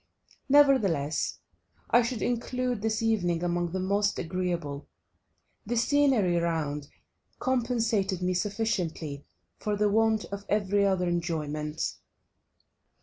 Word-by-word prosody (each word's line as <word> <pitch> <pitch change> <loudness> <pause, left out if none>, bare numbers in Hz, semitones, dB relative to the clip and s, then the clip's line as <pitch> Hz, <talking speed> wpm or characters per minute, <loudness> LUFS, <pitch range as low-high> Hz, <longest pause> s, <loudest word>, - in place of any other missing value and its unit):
Nevertheless 215 - +3 0.5
I 240 - +6
should 235 -1 -2
include 245 -1 -1
this 220 +1 -1
evening 175 -7 +1
among 175 -1 0
the 190 - -2
most 200 +2 +1
agreeable; 170 -5 -3 0.8
the 240 +3 -2
scenery 240 -8 +3
round 155 -4 -1 0.5
compensated 230 -7 0
me 180 0 0
sufficiently 180 -8 -2 0.3
for 210 -1 -1
the 210 0 +2
want 220 +1 +2
of 200 0 -5
every 200 -1 +2
other 185 -2 +1
enjoyment. 155 -3 -2
195 Hz, 105 wpm, -28 LUFS, 170-225 Hz, 0.8 s, I